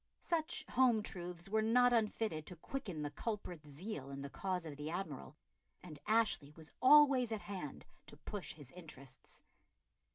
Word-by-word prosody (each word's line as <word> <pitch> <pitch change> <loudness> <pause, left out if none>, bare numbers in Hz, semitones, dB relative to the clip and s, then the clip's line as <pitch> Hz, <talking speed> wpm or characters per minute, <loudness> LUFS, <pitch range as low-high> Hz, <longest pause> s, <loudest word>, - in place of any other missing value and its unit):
Such 330 -2 -1
home 240 -4 +4
truths 175 -2 -5
were 220 +2 +2
not 245 +3 +5
unfitted 215 -8 0
to 180 - -6
quicken 185 - -4
the 145 - -3
culprit's 175 -5 -4
zeal 145 -2 -6
in 140 0 -6
the 140 0 -6
cause 185 -3 -2
of 150 -3 -6
the 145 +2 -5
Admiral, 160 -5 -5 0.5
and 155 -5 -8
Ashley 215 -10 +3
was 160 -1 -12
always 270 -3 +7
at 220 -2 -2
hand 185 -8 -6 0.2
to - - -11
push 200 +6 -5
his 145 -4 -12
interests. 140 -7 -11
180 Hz, 160 wpm, -37 LUFS, 150-225 Hz, 0.5 s, always